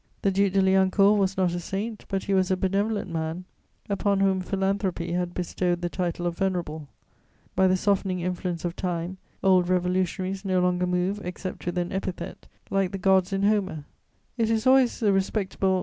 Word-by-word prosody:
The 195 - +3
Duc 195 0 +2
de 195 - +4
Liancourt 190 +2 +4
was 195 -1 0
not 185 -2 +2
a 175 - -2
saint, 205 +5 -4
but 195 -1 -1
he 200 - -1
was 185 -1 +2
a 185 - +2
benevolent 200 +1 -1
man, 165 +2 -3 0.4
upon 200 0 +1
whom 190 -1 +2
philanthropy 190 -2 -1
had 175 0 -2
bestowed 175 0 -1
the 175 - -1
title 175 -1 -2
of 175 -1 -1
venerable; 170 -5 -2 0.7
by 190 +1 +4
the 185 0 +3
softening 195 -1 0
influence 180 -1 -3
of 175 0 -2
Time, 180 0 -3 0.3
old 185 -2 +4
Revolutionaries 185 +1 0
no 185 -2 +1
longer 180 0 +1
move 180 +3 0
except 180 0 -6
with 175 - -2
an 175 0 -1
epithet, 190 -1 -5 0.2
like 195 -1 +1
the - - -2
gods 190 0 +3
in 195 0 0
Homer: 195 -7 +1 0.5
it 225 -1 +2
is 220 -1 +1
always 260 -1 +4
the 210 -3 +3
respectable 195 -1 0
M. - - 0
185 Hz, 185 wpm, -26 LUFS, 180-195 Hz, 0.7 s, de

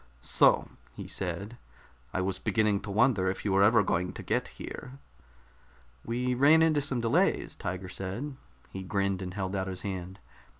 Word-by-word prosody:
"So!" - - +4 0.3
he - - -7
said. 100 +5 -4 0.5
"I 95 - -1
was 95 0 -1
beginning 105 -3 +1
to 100 - -8
wonder 105 -2 +3
if 95 - -5
you 100 - +1
were 95 0 +4
ever 110 +2 +5
going 90 -1 -1
to - - -8
get - - 0
here." 125 - -9 1.1
"We 125 +2 -1
ran 145 +6 +6
into 155 -2 +3
some 135 -4 +1
delays," 115 -1 +1
Tiger 90 +1 -5
said. 105 +11 -5 0.4
He 95 - -6
grinned 100 0 -1
and 90 0 -6
held 95 -1 -3
out 95 0 -1
his 95 -1 -5
hand. 95 -1 -5
100 Hz, 170 wpm, -29 LUFS, 95-120 Hz, 1.1 s, ran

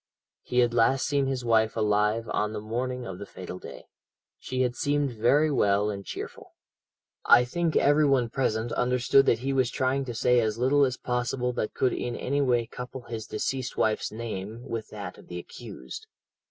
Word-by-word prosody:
He 125 0 +1
had 120 -1 +2
last 120 +3 +3
seen 140 -2 +1
his 130 -2 -2
wife 110 -1 +2
alive 105 +1 +1
on 105 0 0
the 105 - -3
morning 125 +4 -3
of 90 - -7
the 100 - -6
fatal 90 0 -8
day. - - -10 0.5
She 130 0 -1
had 125 -1 -1
seemed 145 -1 0
very 135 +7 +3
well 105 -4 +2
and 100 -1 -6
cheerful. - - -8 0.7
"I 120 +1 +6
think 165 +4 -1
every 145 +1 +4
one 130 -4 +3
present 115 -3 -1
understood 125 +2 +3
that 115 - +3
he 135 - +1
was 130 -3 +2
trying 130 +2 0
to 120 -2 -5
say 125 +2 +3
as 110 -1 0
little 135 +4 +4
as 130 -1 -2
possible 125 0 -1
that 105 - -3
could 130 - +2
in 120 -1 -3
any 140 +2 -1
way 120 -3 +2
couple 125 +2 -8
his 115 -2 -6
deceased 130 0 -3
wife's 110 -1 +1
name 110 0 -6
with 110 -2 -4
that 100 -4 -7
of - - -16
the 90 - -6
accused. 65 -6 -9
120 Hz, 190 wpm, -27 LUFS, 110-130 Hz, 0.7 s, I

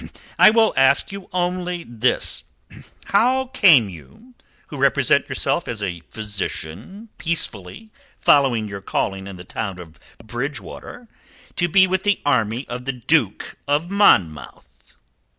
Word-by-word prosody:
I - - +9
will 225 0 +3
ask 135 +6 +3
you 195 -1 -9
only 180 -1 -2
this: 120 +1 -1 0.6
How 255 +6 +2
came 165 - +6
you, 95 - -14 0.4
who - - -8
represent - - +2
yourself 170 - -1
as 110 -3 -4
a 90 -3 -4
physician 105 - -6
peacefully 160 - -3 0.3
following 130 -7 +3
your 100 -1 -7
calling 95 0 -3
in 100 - -8
the 90 - -10
town 100 0 -5
of 85 -2 -13 0.2
Bridgewater, 135 - -7 0.5
to 175 - +1
be 185 +3 +5
with 190 0 -1
the 205 -1 +1
army 125 -2 0
of 125 +1 -7
the 135 - -2
Duke 125 - -1
of 150 +5 0
Monmouth?" 95 - +1
135 Hz, 135 wpm, -21 LUFS, -, 0.6 s, I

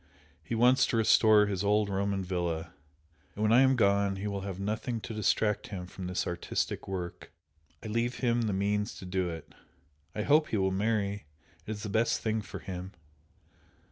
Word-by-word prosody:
He 85 - -3
wants 125 +3 +4
to 115 - 0
restore 110 -1 +5
his 100 -2 -2
old 105 +1 +2
Roman 100 0 -1
villa 85 -2 -3 0.6
and 105 - -2
when 110 - +3
I 125 - +7
am 135 0 +5
gone 100 -3 +2
he 95 +2 -5
will 100 -1 -3
have 95 -1 -5
nothing 110 +4 -2
to 110 - -6
distract 105 0 +1
him 95 -3 -6
from 90 0 -7
this 90 0 -1
artistic 85 0 -3
work, 90 -3 -6 0.5
I - - -5
leave 115 +3 -1
him 120 -2 +1
the - - 0
means 105 +2 -1
to - - -9
do 90 -1 -1
it! 80 -2 -8 0.6
I 105 - -1
hope 150 +4 +4
he 110 - -1
will 95 -1 +1
marry 100 -2 -1 0.4
it - - -8
is 105 -1 -5
the 105 - -4
best 110 +3 +1
thing 110 0 -1
for 100 - -8
him!" 95 +1 -7
100 Hz, 190 wpm, -30 LUFS, 95-110 Hz, 0.6 s, I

